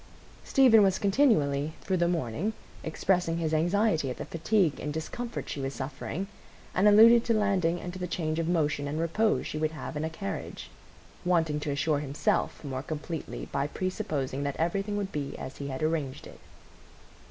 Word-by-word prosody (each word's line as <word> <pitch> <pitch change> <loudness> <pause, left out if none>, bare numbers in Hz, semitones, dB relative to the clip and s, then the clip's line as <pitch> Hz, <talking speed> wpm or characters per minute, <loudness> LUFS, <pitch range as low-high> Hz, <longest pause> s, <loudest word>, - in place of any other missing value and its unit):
Stephen 250 -5 +6
was 190 -2 +4
continually, 160 - +2
through 190 - -1
the 170 0 +2
morning, 170 - -1 0.3
expressing 170 0 0
his 160 -2 -1
anxiety 175 -1 +2
at 125 - -5
the - - -5
fatigue 170 -1 +1
and 150 - -3
discomfort 230 +10 -5
she 140 - -4
was 135 0 -3
suffering, 145 +7 -4 0.5
and 195 +3 +4
alluded 225 +3 +8
to 230 - +1
landing 190 -5 +1
and 175 0 -6
to 185 - -7
the 180 - -3
change 160 -2 -2
of 165 - -1
motion 150 -4 +1
and 150 +2 -3
repose 215 +7 +1
she 155 - -4
would 155 0 +1
have 155 - -6
in 150 - -2
a 160 - -1
carriage, 100 -12 -6 0.5
wanting 160 -4 +2
to 150 - -4
assure 145 +1 +1
himself 145 +2 -1
more 130 -3 -4
completely 155 +2 -5
by 140 +1 0
presupposing 145 -6 -3
that 140 -1 -2
everything 195 +5 -1
would 200 -1 -3
be 140 -2 -4
as 130 - -7
he 140 - -5
had 130 +2 -4
arranged 155 -4 -1
it. - - -12
160 Hz, 180 wpm, -29 LUFS, 145-190 Hz, 0.5 s, alluded